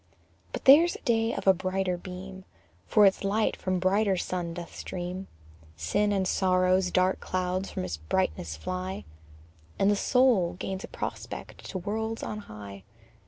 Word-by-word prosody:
But -, -, -6 dB
there's 320 Hz, +6 st, +8 dB
a -, -, -10 dB
day 225 Hz, -3 st, +2 dB
of -, -, -4 dB
a 190 Hz, -, +7 dB
brighter 185 Hz, 0 st, -1 dB
beam, 185 Hz, +1 st, -8 dB, 0.4 s
For 210 Hz, -, +6 dB
its 195 Hz, 0 st, +3 dB
light 210 Hz, +2 st, +1 dB
from 185 Hz, 0 st, -2 dB
a -, -, +1 dB
brighter 190 Hz, +2 st, +2 dB
sun 175 Hz, -2 st, -3 dB
doth 175 Hz, -1 st, -8 dB
stream: 180 Hz, +1 st, -5 dB, 0.5 s
Sin 205 Hz, -, +1 dB
and 190 Hz, -2 st, +1 dB
sorrow's 185 Hz, -1 st, +3 dB
dark 185 Hz, +1 st, +2 dB
clouds 185 Hz, +1 st, -2 dB
from 90 Hz, -, -4 dB
its 85 Hz, -4 st, -4 dB
brightness 80 Hz, +1 st, -1 dB
fly 185 Hz, -, -4 dB, 0.7 s
And 195 Hz, +1 st, +4 dB
the -, -, +3 dB
soul 230 Hz, -6 st, +3 dB
gains 190 Hz, +1 st, -5 dB
a -, -, -6 dB
prospect -, -, -6 dB
to 190 Hz, -, -3 dB
worlds 220 Hz, +4 st, -3 dB
on 210 Hz, -, -4 dB
high. 100 Hz, -, -10 dB
185 Hz, 165 wpm, -28 LUFS, 180-205 Hz, 0.7 s, there's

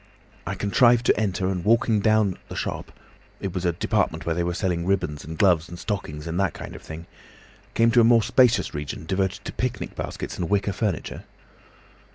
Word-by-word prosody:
I -, -, -2 dB
contrived 120 Hz, +3 st, +3 dB
to -, -, +3 dB
enter, 95 Hz, -3 st, 0 dB
and 90 Hz, -3 st, -2 dB
walking 115 Hz, 0 st, +3 dB
down 110 Hz, -2 st, +2 dB
the -, -, -7 dB
shop—it 95 Hz, -3 st, -7 dB
was 90 Hz, -1 st, -3 dB
a 85 Hz, -, +2 dB
department 85 Hz, -, -1 dB
where 85 Hz, -, 0 dB
they 85 Hz, +1 st, -1 dB
were 85 Hz, 0 st, -2 dB
selling 90 Hz, -3 st, -1 dB
ribbons 75 Hz, -7 st, -1 dB
and 80 Hz, 0 st, -7 dB
gloves 85 Hz, -4 st, +3 dB
and 85 Hz, -, -8 dB
stockings 85 Hz, -8 st, -4 dB
and 85 Hz, +2 st, -3 dB
that 100 Hz, -2 st, 0 dB
kind -, -, -8 dB
of -, -, -10 dB
thing—came 85 Hz, +7 st, -4 dB
to 120 Hz, 0 st, +5 dB
a -, -, +5 dB
more 115 Hz, -1 st, +5 dB
spacious 125 Hz, 0 st, +3 dB
region 75 Hz, +1 st, -5 dB
devoted 95 Hz, +3 st, -1 dB
to -, -, -5 dB
picnic 125 Hz, -1 st, -3 dB
baskets -, -, -5 dB
and 85 Hz, -, -2 dB
wicker 100 Hz, 0 st, +1 dB
furniture. 100 Hz, -4 st, -3 dB
95 Hz, 190 wpm, -24 LUFS, 85-110 Hz, -, to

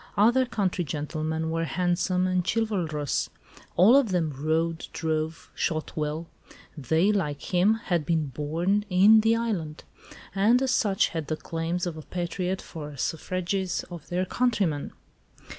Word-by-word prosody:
Other 240 Hz, +5 st, +4 dB
country 190 Hz, -6 st, -1 dB
gentlemen 155 Hz, +1 st, -3 dB
were 165 Hz, 0 st, 0 dB
handsome 180 Hz, +1 st, 0 dB
and 185 Hz, -1 st, +1 dB
chivalrous. 175 Hz, -, -1 dB, 0.5 s
All 205 Hz, +8 st, +7 dB
of 275 Hz, -5 st, +4 dB
them 170 Hz, -5 st, 0 dB
rode, 160 Hz, +3 st, -1 dB
drove, 160 Hz, 0 st, -3 dB
shot 155 Hz, -1 st, -2 dB
well; 155 Hz, +2 st, -2 dB, 0.5 s
they, 160 Hz, -, +2 dB
like 150 Hz, -6 st, -2 dB
him, 190 Hz, +5 st, +4 dB
had 180 Hz, -8 st, -1 dB
been 160 Hz, 0 st, +1 dB
born 165 Hz, +10 st, 0 dB
"in 200 Hz, +4 st, +7 dB
the 225 Hz, +1 st, +3 dB
island," 190 Hz, -10 st, -3 dB, 0.5 s
and 210 Hz, +6 st, +4 dB
as 265 Hz, -1 st, 0 dB
such 200 Hz, -6 st, +2 dB
had 160 Hz, -3 st, -4 dB
the 155 Hz, -, -2 dB
claims 165 Hz, +3 st, -3 dB
of 170 Hz, -3 st, -4 dB
a -, -, -6 dB
patriot 180 Hz, +3 st, -3 dB
for 155 Hz, -3 st, -7 dB
the 145 Hz, -, -11 dB
suffrages 185 Hz, +4 st, -2 dB
of 170 Hz, -4 st, -9 dB
their 180 Hz, +1 st, 0 dB
countrymen. 195 Hz, -10 st, 0 dB
175 Hz, 145 wpm, -26 LUFS, 155-195 Hz, 0.5 s, All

